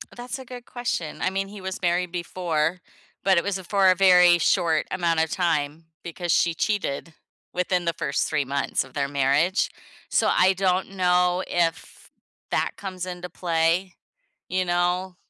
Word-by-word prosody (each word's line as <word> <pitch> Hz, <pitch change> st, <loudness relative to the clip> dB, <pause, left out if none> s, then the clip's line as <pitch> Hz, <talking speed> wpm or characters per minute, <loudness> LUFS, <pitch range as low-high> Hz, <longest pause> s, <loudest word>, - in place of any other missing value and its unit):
That's 245 Hz, +2 st, -6 dB
a 260 Hz, -, -9 dB
good 245 Hz, 0 st, -10 dB
question. 240 Hz, -10 st, -4 dB
I -, -, +2 dB
mean, 195 Hz, +1 st, -2 dB
he 205 Hz, -1 st, -10 dB
was 190 Hz, 0 st, -5 dB
married 175 Hz, 0 st, 0 dB
before, 170 Hz, -1 st, -1 dB, 0.4 s
but 190 Hz, -2 st, +4 dB
it 170 Hz, -, +3 dB
was 200 Hz, -1 st, -1 dB
a 190 Hz, -, -9 dB
for 195 Hz, +1 st, +3 dB
a -, -, +2 dB
very 180 Hz, -2 st, +6 dB
short 160 Hz, -1 st, +2 dB
amount 170 Hz, -3 st, +1 dB
of 160 Hz, -, -3 dB
time 160 Hz, -3 st, -1 dB, 0.2 s
because 170 Hz, 0 st, -4 dB
she 170 Hz, +1 st, +3 dB
cheated 165 Hz, -4 st, -2 dB, 0.4 s
within 180 Hz, 0 st, 0 dB
the 170 Hz, -, +1 dB
first 145 Hz, -4 st, -1 dB
3 145 Hz, -3 st, 0 dB
months 140 Hz, 0 st, -1 dB
of 130 Hz, -1 st, -16 dB
their 140 Hz, -1 st, -1 dB
marriage. 145 Hz, +7 st, +1 dB, 0.4 s
So, -, -, +2 dB
I 190 Hz, +1 st, +4 dB
don't 185 Hz, 0 st, 0 dB
know 180 Hz, 0 st, +2 dB
if 170 Hz, -2 st, -2 dB, 0.4 s
that -, -, +1 dB
comes 185 Hz, -2 st, -6 dB
into 180 Hz, 0 st, -6 dB
play, 170 Hz, +2 st, 0 dB, 0.5 s
you 185 Hz, 0 st, +1 dB
know? 180 Hz, +1 st, 0 dB
180 Hz, 170 wpm, -24 LUFS, 165-185 Hz, 0.5 s, very